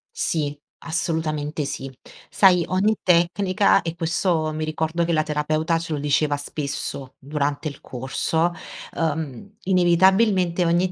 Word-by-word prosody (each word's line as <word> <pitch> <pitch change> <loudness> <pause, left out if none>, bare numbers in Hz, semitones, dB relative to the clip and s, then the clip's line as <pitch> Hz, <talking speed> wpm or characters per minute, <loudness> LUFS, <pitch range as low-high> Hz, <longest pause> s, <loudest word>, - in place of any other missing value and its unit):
Sì, 145 -3 -1 0.2
assolutamente 160 -3 -2
sì. 135 -1 -5 0.4
Sai 180 -4 +4
ogni 200 +4 +1
tecnica 185 +3 +3
e 165 0 -4
questo 165 -1 0
mi 155 0 -3
ricordo 160 +2 -1
che 170 - 0
la 155 -1 +2
terapeuta 155 +2 0
ce 165 -1 -5
lo 150 - -2
diceva 145 +1 +1
spesso 140 -2 -5
durante 145 +2 -2
il 140 - -12
corso, 150 +6 -1 0.5
ehm, 160 - -3
inevitabilmente 185 0 +3
ogni 175 +2 +2
160 Hz, 125 wpm, -23 LUFS, 150-175 Hz, 0.5 s, Sai